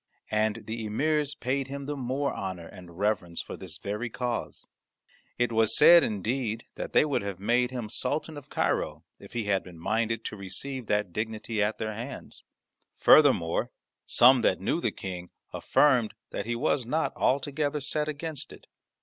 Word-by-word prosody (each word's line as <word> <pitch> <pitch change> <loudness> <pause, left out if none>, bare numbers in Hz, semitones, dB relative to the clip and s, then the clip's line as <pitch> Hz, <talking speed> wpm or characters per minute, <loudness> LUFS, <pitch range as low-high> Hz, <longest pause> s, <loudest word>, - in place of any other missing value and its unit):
And 110 +1 +1
the 110 +1 -4
emirs 145 +6 +1
paid 135 +2 -1
him 140 0 -6
the 145 +1 -3
more 135 +2 -1
honour 95 -3 -5
and 85 0 -12
reverence 95 -4 -1
for - - -6
this - - -8
very 105 +4 -4
cause. 120 0 -4 0.7
It 120 -1 +1
was 110 -1 +3
said, 170 -1 +8
indeed, 110 +2 -2
that - - -6
they - - +5
would 145 -3 0
have 100 -2 -5
made 120 +5 +2
him 125 -4 -4
Sultan 150 +7 -2
of 145 -2 -10
Cairo, - - -1 0.2
if - - -14
he 120 -2 -1
had 100 -2 +1
been 90 -2 -12
minded 115 +6 -1
to - - -4
receive 110 +6 -6
that 105 -4 0
dignity 110 +1 -2
at 105 +1 +1
their 110 -1 -3
hands; 120 +6 -8 0.5
furthermore, 130 - +5 0.4
some 125 +2 +6
that - - +2
knew - - 0
the - - +1
King 90 -2 -7 0.2
affirmed 125 -7 +3 0.2
that - - -4
he 120 - -1
was 125 +2 +1
not 155 +7 -1
altogether 145 +2 0
set 150 +2 -2
against 155 -1 -5
it. - - -14
115 Hz, 170 wpm, -28 LUFS, 105-140 Hz, 0.7 s, said